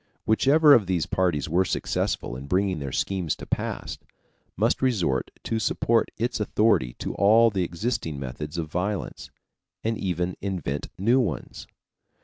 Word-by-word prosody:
Whichever 145 +7 +5
of 110 -8 +4
these 90 -4 0
parties 90 -7 0
were 85 +4 +2
successful 60 - -2
in 65 +2 -8
bringing 95 +1 +1
their 70 -2 -5
schemes 90 +2 -1
to - - -10
pass, - - -3 0.6
must - - +1
resort 100 - +1
to 115 - -1
support 115 +1 +1
its 120 +2 -1
authority 105 - +2
to - - -4
all 110 +3 +5
the 95 -3 0
existing 85 - -3
methods 75 +5 -6
of 85 - -1
violence, 95 +4 -3 0.5
and 115 0 -1
even 90 -1 -2
invent 85 -8 -3
new 115 +7 +3
ones. 90 - -3
95 Hz, 145 wpm, -25 LUFS, 80-110 Hz, 0.6 s, Whichever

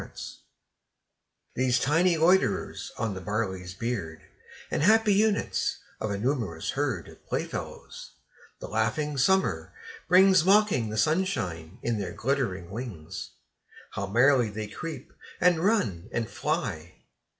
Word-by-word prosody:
Insects - - -9 1.1
These 125 -1 +2
tiny 165 +6 +3
loiterers 165 - +2
on 115 -3 -1
the 95 - -6
barley's 95 -2 -3
beard, 95 -8 -4 0.5
And - - 0
happy 215 +4 +5
units 210 +1 +1 0.2
of 110 - -2
a 100 - -2
numerous 110 - -1
herd - - -2
Of - - -15
playfellows, - - -5 0.4
the - - -7
laughing 135 +7 -1
Summer 190 +8 +1 0.3
brings, 185 -1 +6
Mocking 195 - +3
the 110 - -4
sunshine 105 - -1
in 115 -3 0
their 100 - -4
glittering 110 -10 -2
wings, 95 -7 -6 0.6
How 100 - -4
merrily 125 +2 +4
they 105 +1 -5
creep, 160 +9 -7 0.3
and 180 -2 +4
run, 110 - +1
and 115 -2 -1
fly! 105 - -3
120 Hz, 125 wpm, -27 LUFS, 100-165 Hz, 1.1 s, brings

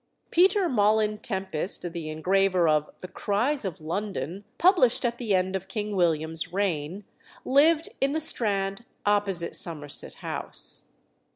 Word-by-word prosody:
Peter 375 +2 +4
Molyn 215 -3 +2
Tempest, 190 -3 -1
the 165 -3 -5
engraver 185 +2 +2
of 150 -1 +2
"The 185 - -6
Cries 235 +10 0
of 190 -5 -4
London," 190 +2 -4
published 340 - +4
at 240 0 -1
the 220 -6 +1
end 185 +1 0
of 190 0 -4
King 210 +1 -3
William's 160 -2 0
reign, 185 -1 -2 0.4
lived 310 +4 +4
in 275 +1 +2
the 315 - 0
Strand 200 -8 0 0.2
opposite 200 -4 +1
Somerset 150 -4 -4
House. - - -4
195 Hz, 130 wpm, -26 LUFS, 175-230 Hz, 0.4 s, Peter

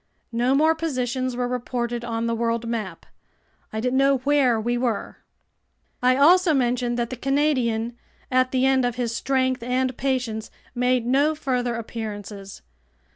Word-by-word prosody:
No 240 +3 +2
more 315 +3 +4
positions 255 -5 -2
were 245 0 -1
reported 240 -1 -3
on 230 -1 -2
the 230 - 0
world 230 0 -1
map. 225 -5 -4 0.7
I 220 - -3
didn't 250 +3 +1
know 275 0 +4
where 275 -5 +3
we 240 +2 -1
were. 240 -3 -2 0.8
I'll 255 +3 +5
also 360 -2 +5
mention 245 -2 0
that 235 0 -2
the - - -3
Canadian, 250 -4 0 0.4
at 255 0 +3
the 255 0 +1
end 265 -1 +3
of 245 -1 0
his 235 -2 -2
strength 260 -1 0
and 255 +1 -1
patience, 245 -5 -2 0.2
made 250 -1 +1
no 285 +5 +2
further 250 -5 -1
appearances. 210 -3 -7
250 Hz, 150 wpm, -24 LUFS, 235-265 Hz, 0.8 s, I'll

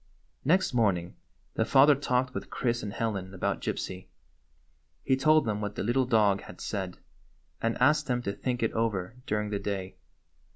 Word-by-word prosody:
Next 185 +2 +2
morning 95 -7 +1 0.4
the - - +1
father 135 +5 +6
talked 130 -2 0
with - - -5
Chris 120 -1 -1
and 105 - -5
Helen 100 -4 -3
about - - -1
Gypsy. 95 0 -4 1.0
He 130 - +3
told 155 +4 +4
them 105 -1 -1
what 105 0 -4
the - - -2
little 120 +4 +1
dog 105 -4 +3
had 90 - -12
said, 95 -4 -4 0.6
and 115 0 0
asked 145 +3 +3
them 125 -1 0
to 100 - -2
think 125 +1 -2
it 115 - 0
over 110 -3 -1
during 105 0 -1
the 100 - -1
day. 95 -2 -4
115 Hz, 170 wpm, -29 LUFS, 100-125 Hz, 1.0 s, father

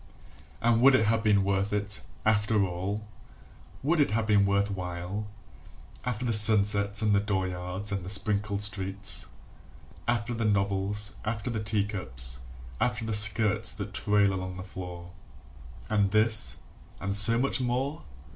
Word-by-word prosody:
And 115 0 +3
would 135 +1 +6
it 110 - +2
have 110 +1 +1
been 105 -3 +2
worth 100 +1 -1
it, 105 0 -2 0.2
after 105 -1 +2
all, 95 +4 -4 0.8
Would 160 +4 +1
it 145 - +3
have 110 +1 -1
been 100 -2 +3
worth 100 +1 0
while, 90 +2 -5 0.8
After 125 -1 -3
the 115 - 0
sunsets 105 -1 +4
and 105 -1 +2
the 100 - +4
dooryards 95 -1 -3
and 95 -2 -3
the 90 - -7
sprinkled 100 0 0
streets, 100 -1 0 0.8
After 120 0 -1
the 115 0 -3
novels, 100 0 -1
after 110 +2 -3
the 110 -2 -3
teacups, 95 - -3 0.4
after 115 -1 -1
the 110 - -3
skirts 105 0 +4
that - - -7
trail 100 -1 +2
along 95 -1 -5
the 90 - -7
floor 90 -2 -9 0.8
And 100 -2 +1
this, 110 +2 +2 0.4
and 100 0 -2
so 115 +3 +7
much 130 +1 +3
more? 130 +5 -2
105 Hz, 145 wpm, -27 LUFS, 100-110 Hz, 0.8 s, so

